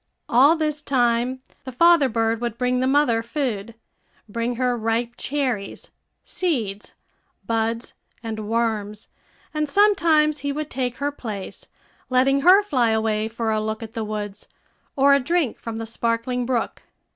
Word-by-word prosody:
All 275 +7 +5
this 305 -2 -1
time 250 -2 +1 0.2
the 260 - -7
father 335 +1 +5
bird 225 0 0
would 235 -2 -3
bring 250 +1 +1
the 255 - +1
mother 265 -5 +3
food 230 -4 -3 0.5
bring 230 +3 -2
her 250 0 +1
ripe 230 +1 -1
cherries, 255 -8 -3 0.3
seeds, 225 - -3 0.5
buds, 230 +1 -2 0.3
and 215 -2 -5
worms; 220 -2 -2 0.4
and 305 -1 -1
sometimes 320 -6 +3
he 285 - -2
would 300 +1 -4
take 250 -1 -2
her 285 +1 -1
place, 215 -8 -7 0.4
letting 265 +2 +3
her 375 +7 +7
fly 255 - +1
away 220 -1 0
for 225 0 -2
a 215 0 0
look 220 +1 -3
at 225 0 -9
the 225 - -3
woods, 210 -1 -5 0.5
or 280 0 +5
a 280 - +5
drink 310 -1 0
from 230 -1 -6
the 225 0 -4
sparkling 230 +2 -1
brook. 245 -3 -2
240 Hz, 150 wpm, -23 LUFS, 225-280 Hz, 0.5 s, her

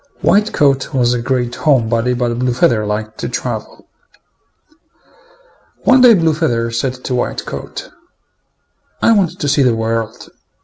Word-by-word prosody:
White 210 +2 +2
coat 140 0 +1
was 120 -2 +2
a 120 - -2
great 125 -1 -1
home 130 -5 +2
body, 115 +2 0
but 120 -1 -1
Blue 125 -1 0
feather 110 -3 +1
liked 110 +1 -4
to - - -3
travel. - - -5 2.0
One 255 0 +5
day 245 -3 +8
Blue 165 -3 +2
feather 120 -8 -1
said 125 +2 -3
to 130 - -3
White 125 - -2
coat, - - -7 1.1
"I - - +5
want 200 -6 +1
to 145 - -2
see 145 0 +2
the 125 -3 +3
world. 115 0 -3
125 Hz, 150 wpm, -16 LUFS, 115-150 Hz, 2.0 s, day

